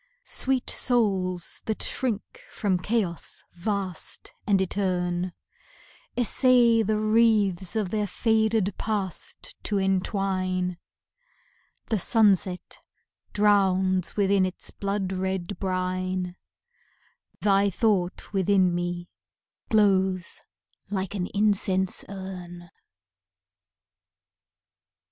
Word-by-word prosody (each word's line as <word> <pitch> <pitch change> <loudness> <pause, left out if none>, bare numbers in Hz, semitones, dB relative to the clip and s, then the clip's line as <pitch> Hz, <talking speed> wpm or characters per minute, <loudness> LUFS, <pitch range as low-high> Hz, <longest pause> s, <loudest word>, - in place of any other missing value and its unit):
Sweet 260 -1 +1
souls 190 -8 +1
that 220 - -1
shrink 235 -6 -2
from 190 -4 0
chaos 195 -4 -2
vast 190 -1 -4
and 200 -2 +4
etern, 180 -2 -1 0.9
Essay 245 -1 +4
the 215 0 +1
wreaths 215 -4 +2
of 210 -4 -1
their 210 -1 0
faded 220 -1 +1
Past 200 -5 -3
to 205 - 0
entwine, 185 -2 0 1.1
The 220 - +1
sunset 195 -4 +2 0.5
drowns 190 -3 +2
within 200 -1 +3
its 185 0 -3
blood 195 -1 -2
red 190 0 -3
brine, 185 -1 -2 1.1
Thy 200 0 +3
thought 195 -2 0
within 190 -2 +3
me 175 0 -3 0.6
glows 190 -4 +2 0.5
like 190 -1 -3
an 185 -3 -2
incense 195 -2 +1
urn. 180 -3 -8
195 Hz, 85 wpm, -26 LUFS, 185-210 Hz, 1.1 s, and